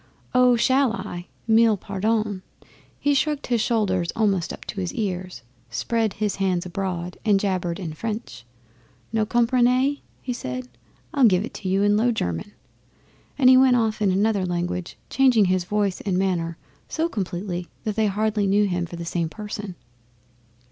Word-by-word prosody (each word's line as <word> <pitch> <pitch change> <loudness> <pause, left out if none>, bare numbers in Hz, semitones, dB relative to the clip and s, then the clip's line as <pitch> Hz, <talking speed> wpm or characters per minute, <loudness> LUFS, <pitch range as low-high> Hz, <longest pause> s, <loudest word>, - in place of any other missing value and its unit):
'Oh! 250 -1 +5
Shall 260 +1 +3
I? 175 -6 -6 0.2
Mille 225 -1 +5
pardons!' 205 0 -1 0.6
He 290 - +2
shrugged 295 +1 0
his 240 -3 +1
shoulders 190 -7 +1
almost 200 -6 +1
up - - -9
to 195 - -4
his 180 - -4
ears 185 -5 -3 0.3
spread 220 - -1
his 210 -1 -2
hands 185 -3 0
abroad, 180 -1 -4
and 205 -2 +3
jabbered 185 -3 -1
in 165 -5 -5
French. 210 - -5 0.7
'No 220 -1 +1
comprenny?' 250 +4 +2 0.2
he 250 - -4
said. 125 - -5 0.5
'I'll 275 -3 +5
give 190 -2 +4
it - - -10
you 190 +1 +1
in 205 0 +4
Low 240 +3 +3
German.' 90 - -3 0.8
And 265 -3 +4
he 255 0 +8
went 260 -1 +6
off 220 -3 0
in 205 - +3
another 200 +1 +2
language, 175 0 -3
changing 255 -6 +4
his 185 -1 +1
voice 205 -1 0
and 190 -3 -1
manner 170 -3 0 0.3
so 325 +1 0
completely 180 - -4 0.2
that 215 -3 -2
they 220 -1 +2
hardly 210 0 0
knew 205 +2 +3
him 175 -3 -1
for 170 - -8
the 170 0 -6
same 165 -1 -1
person. 210 -1 -6
205 Hz, 160 wpm, -24 LUFS, 180-230 Hz, 0.8 s, he